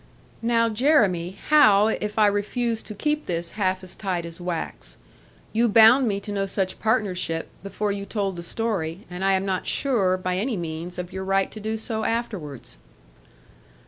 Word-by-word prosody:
'Now, 230 0 +2
Jeremy, 210 - +2
how 215 -10 +6
if 210 -1 -2
I 215 - +6
refuse 220 +3 0
to 215 - -9
keep 300 +7 -1
this 170 -1 -2
half 190 -2 -1
as 185 - -8
tight 185 -4 -3
as 170 +1 -9
wax. 175 -2 -5 0.6
You 230 +1 +3
bound 230 +4 +7
me 200 -2 0
to 205 - -7
no 195 -1 -1
such 190 -1 -2
partnership, 185 -7 0
before 205 +1 -2
you 200 0 -4
told 195 -2 -2
the 170 - -6
story; 190 -2 -3
and 180 +2 -5
I 195 0 +3
am 190 0 +1
not 190 -2 -2
sure, 200 -10 +1
by 185 0 -2
any 225 +1 -1
means, 170 +1 -5
of 180 0 -6
your 190 0 -4
right 195 0 +1
to 215 - -8
do 220 +1 -3
so 220 0 -3
afterwards.' 175 - -4
200 Hz, 175 wpm, -24 LUFS, 180-220 Hz, 0.6 s, bound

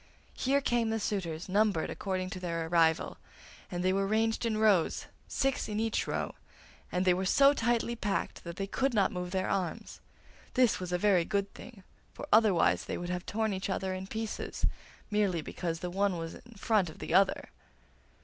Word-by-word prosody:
Here 275 +2 +1
came 240 -4 +1
the 225 0 0
suitors 175 -6 -3
numbered 200 -3 +1
according 185 -2 -3
to 190 - -5
their 170 -2 -2
arrival, 160 -1 +2 0.5
and 180 0 -3
they 185 - +3
were 195 0 +1
ranged 225 +2 +1
in 220 -2 0
rows, 210 -6 +3 0.2
six 270 -4 0
in 210 0 -2
each 225 0 0
row, - - -2 0.6
and 180 +1 0
they 180 - +5
were 185 +2 -1
so 275 +7 +6
tightly 235 -2 0
packed 205 -3 -2
that 170 -1 -7
they 195 - -2
could 265 +5 0
not 200 -2 +3
move 180 -1 -4
their 185 0 -1
arms. 190 -2 -3 0.6
This 250 -3 +4
was 180 -1 -5
a 180 - +2
very 185 -2 +3
good 200 +2 -2
thing, 210 -6 -12 0.3
for - - -7
otherwise 215 -6 +4
they - - -3
would 175 0 -5
have 180 0 -3
torn 220 0 0
each 190 +1 -3
other 190 0 -1
in 185 0 -5
pieces, 220 +1 -3 0.5
merely 200 -6 +1
because 165 0 -4
the 180 - -3
one 195 -1 +1
was 165 0 -5
in 235 - -14
front 200 -3 +1
of 155 - -12
the - - -5
other. 195 +1 +3
195 Hz, 190 wpm, -31 LUFS, 180-220 Hz, 0.6 s, so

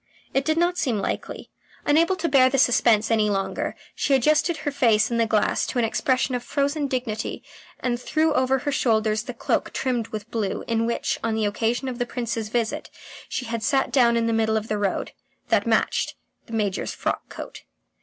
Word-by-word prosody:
It 270 +1 +1
did 315 +1 +1
not 350 +1 +2
seem 245 -6 0
likely. 195 - -4 0.3
Unable 330 +5 +3
to 335 -2 -2
bear 265 -4 +5
the 275 - 0
suspense 235 -4 +4
any 215 -2 +3
longer, 195 -1 -2 0.2
she 280 - +1
adjusted 305 +5 +2
her 305 -1 -3
face 230 -5 +3
in 235 - 0
the 230 -1 +2
glass 215 -1 +1
to - - -4
an 240 - +3
expression 255 +3 0
of 245 - -1
frozen 285 +2 0
dignity 240 -5 -3 0.4
and 245 -1 -1
threw 315 +3 +1
over 260 -1 +2
her 285 +3 -2
shoulders 220 -4 +1
the - - -7
cloak - - -1
trimmed 245 -4 -1
with 215 +1 -7
blue 210 -4 -2
in 230 0 +1
which, 235 - -1
on 225 -1 0
the 220 -1 0
occasion 230 +5 -1
of 250 -1 -4
the 245 - -1
Prince's 230 -3 -3
visit, 230 -1 -2 0.4
she 250 - -3
had 230 -1 -3
sat 270 +4 +1
down 235 -3 +4
in 230 - +1
the 230 - +1
middle 220 0 +2
of 220 +1 -4
the 210 -1 -1
road. 200 -2 -1 0.4
That - - +2
matched - - +1 0.3
the 230 - -10
Major's 205 -3 -1
frock - - -3
coat. - - -8
235 Hz, 200 wpm, -24 LUFS, 220-270 Hz, 0.4 s, bear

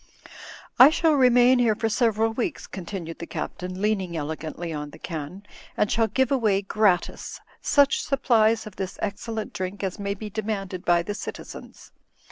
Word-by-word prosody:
"X 280 +6 +9
shall 325 -2 +3
remain 250 -2 +5
here 230 -3 +3
for 225 - -1
several 225 0 +1
weeks," 235 0 -3
continued 175 -3 -7
the 170 - -6
Captain, 185 +1 -5
leaning 195 -5 -1
elegantly 160 +2 -5
on 150 -1 -5
the - - -13
can, 165 +3 -6 0.3
'"and 210 - +1
shall 225 0 +2
give 260 +5 +1
away, 215 -7 +2
gratis, 195 -3 0 0.2
such 285 -1 +3
supplies 230 -5 +2
of 210 -3 -11
this 190 -1 -4
excellent 215 +1 -4
drink 190 +2 -4
as 190 +1 -3
may 200 0 -2
be 215 +2 -7
demanded 195 -3 -4
by 175 -1 +3
the 205 - -4
citizens. - - -9
205 Hz, 160 wpm, -25 LUFS, 185-225 Hz, 0.3 s, X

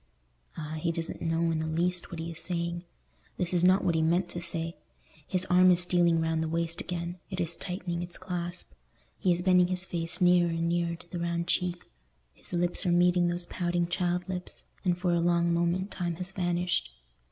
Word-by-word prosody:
Ah, 155 0 -5
he 170 +1 0
doesn't 165 0 -4
know 165 0 +1
in 160 - -1
the 160 - -2
least 175 +3 -1
what 170 - -7
he 165 +1 -4
is 165 - -4
saying. 170 0 -1 0.5
This 180 0 -1
is 175 -1 +3
not 185 +2 +5
what 170 - +2
he 160 - +1
meant 175 +3 +1
to 175 - -5
say. 165 -1 -1 0.5
His 185 0 +3
arm 180 0 +5
is 180 -1 +5
stealing 175 -2 +3
round 160 0 0
the 160 - -1
waist 165 +1 -1
again; 175 0 -5
it 185 -2 -5
is 170 -1 +1
tightening 180 -2 -4
its 175 0 -6
clasp; 175 - -5 0.5
he 185 - +2
is 175 0 +1
bending 180 -1 +5
his 180 0 0
face 170 -1 -2
nearer 180 -1 +4
and 165 0 -1
nearer 170 0 0
to 170 0 -16
the 175 - -4
round 170 0 -1
cheek; 180 0 -1 0.5
his - - -6
lips 175 +1 +3
are 180 - +1
meeting 175 0 +4
those 175 0 0
pouting 175 0 -1
child 180 +1 -1
lips, 180 -1 -4 0.2
and 180 -3 +1
for 180 -1 0
a 170 - +2
long 170 0 +2
moment 175 +3 0
time 175 -2 -3
has 180 +2 -3
vanished. 175 - -1
175 Hz, 210 wpm, -29 LUFS, 170-180 Hz, 0.5 s, not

